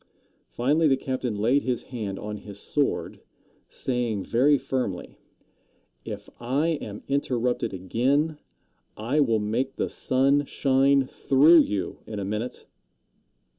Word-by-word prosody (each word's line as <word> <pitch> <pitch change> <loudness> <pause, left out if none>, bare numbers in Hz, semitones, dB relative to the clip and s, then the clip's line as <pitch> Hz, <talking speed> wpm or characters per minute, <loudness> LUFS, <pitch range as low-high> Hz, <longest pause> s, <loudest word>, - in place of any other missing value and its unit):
Finally 150 +6 +2
the 135 -2 +3
captain 130 -4 -3
laid 120 +7 +2
his 125 -2 -2
hand 105 -5 -4
on 105 0 -5
his 100 -1 -10
sword, 145 +5 -1 0.5
saying 120 -6 -2
very 140 +5 +3
firmly: 125 -10 -4 0.8
"If - - -7
I 135 +7 0
am 105 0 -7
interrupted 125 -3 0
again, 135 - 0 0.6
I 120 +8 0
will 115 -6 +3
make 115 +6 -2
the - - -2
sun 140 +2 +2
shine 135 0 +3
through 145 +6 +5
you 100 - -1
in 110 - -6
a 100 - -3
minute." 105 +5 -4
125 Hz, 125 wpm, -26 LUFS, 110-140 Hz, 0.8 s, through